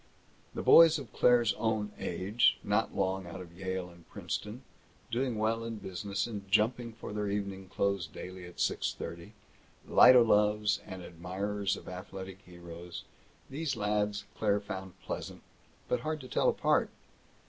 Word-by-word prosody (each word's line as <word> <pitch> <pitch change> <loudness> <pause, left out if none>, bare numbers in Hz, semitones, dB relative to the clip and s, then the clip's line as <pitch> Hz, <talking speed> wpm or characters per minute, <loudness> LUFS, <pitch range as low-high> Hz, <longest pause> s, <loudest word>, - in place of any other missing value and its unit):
The - - -3
boys 165 -1 +8
of 130 -7 -9
Claire's 120 -2 +4
own 110 -2 0
age, 100 +7 +2
not 105 +2 0
long 95 -1 -1
out 85 +2 -7
of 85 -2 -11
Yale 95 -1 -3
and 85 -1 -19
Princeton, 110 +5 -5 0.5
doing 125 -1 0
well 110 +1 0
in 115 0 -4
business 100 0 -3
and 100 -4 -7
jumping 115 +3 +2
for 110 -2 -8
their 105 -1 -2
evening 100 -2 -3
clothes 100 -3 0
daily 90 +3 -9
at 90 - -12
six - - 0
thirty, 85 0 -7 0.5
light 130 - +8
o' 125 - +8
loves 105 -1 +3
and 95 -1 -7
admirers 95 +4 -3
of - - -12
athletic 95 +1 -8
heroes, 85 -1 -9 0.4
these 145 -1 -3
lads 105 -1 0
Claire 105 -2 +2
found 95 -2 -7
pleasant, - - -6 0.4
but 125 - +1
hard 155 0 -3
to 130 - -9
tell - - +2
apart. - - +2
100 Hz, 155 wpm, -31 LUFS, 95-110 Hz, 0.5 s, boys